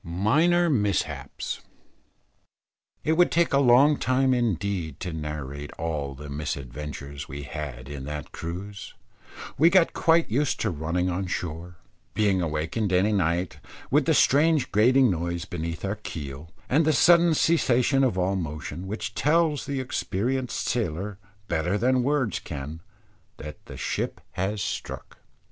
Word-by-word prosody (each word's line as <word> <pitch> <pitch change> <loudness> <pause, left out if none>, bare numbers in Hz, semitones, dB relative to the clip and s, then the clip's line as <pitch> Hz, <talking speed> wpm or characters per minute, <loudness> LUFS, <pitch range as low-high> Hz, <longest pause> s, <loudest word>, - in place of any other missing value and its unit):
MINOR 150 - +2
MISHAPS. 105 - -1 1.4
It 155 - +1
would 175 +2 +4
take 170 -2 +2
a 140 - +5
long 140 +3 +6
time 130 0 +2
indeed 100 - -1
to 90 -2 -4
narrate 75 -2 -5
all 75 -4 -3
the 75 +2 -9
misadventures 70 0 -6
we 70 +2 -6
had 70 -3 -6
in 70 -2 -7
that 75 -1 -6
cruise. 95 +5 -7 0.6
We 165 +3 +7
got 180 -1 +4
quite 165 0 +3
used 135 +6 0
to 105 - +1
running 85 +3 -1
on 90 +2 -2
shore, 90 0 -4 0.4
being 100 -4 +2
awakened 85 +6 -1
any 95 +4 +3
night, 90 -3 0 0.3
with - - +4
that - - +3
strange 150 +1 +3
grating 125 +4 +5
noise 85 0 -2
beneath 85 -1 -4
our 100 +2 -2
keel, 75 -6 -7 0.2
and 150 +5 +3
the 155 0 +3
sudden 170 -1 +5
cessation 135 -4 +3
of 120 -8 +1
all 95 +2 +1
motion, 80 +1 -5
which 105 0 -4
tells 155 +2 +2
the 140 -2 -2
experienced 130 0 -2
sailor 100 -3 -2 0.3
better 90 +4 0
than 125 +3 +2
words 130 - 0
can, 75 +3 -7 0.6
that 75 0 -9
the - - -9
ship - - -2
has 95 +2 -2
struck. - - -6
95 Hz, 140 wpm, -26 LUFS, 80-130 Hz, 1.4 s, We